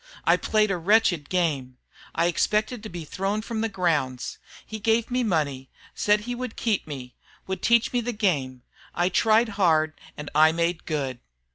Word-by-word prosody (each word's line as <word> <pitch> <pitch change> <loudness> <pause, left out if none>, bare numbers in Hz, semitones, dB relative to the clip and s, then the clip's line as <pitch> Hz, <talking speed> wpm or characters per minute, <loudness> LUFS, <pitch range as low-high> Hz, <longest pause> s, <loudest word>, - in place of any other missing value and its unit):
I - - +5
played 215 -2 +1
a 190 - 0
wretched 175 -4 +2
game. 145 -8 -1 0.4
I 165 - +2
expected 210 +6 0
to 215 - -8
be 170 -2 -7
thrown 195 +6 -2
from 225 -1 -3
the 225 - 0
grounds. 150 - -1 0.3
He 220 - -7
gave 225 +3 +1
me 250 +1 +1
money, 145 - -1 0.2
said 210 0 +2
he 245 +3 -4
would 250 -1 -5
keep 220 -7 -1
me, 130 -4 -7 0.3
would 190 0 -4
teach 235 0 +3
me 245 - +2
the 240 +1 -2
game. 145 - -1 0.3
I 175 +1 +2
tried 220 +4 +3
hard 160 -6 +2 0.2
and 150 - -7
I 155 +1 +5
made 170 0 -1
good." 135 -5 -2
185 Hz, 175 wpm, -25 LUFS, 155-220 Hz, 0.4 s, I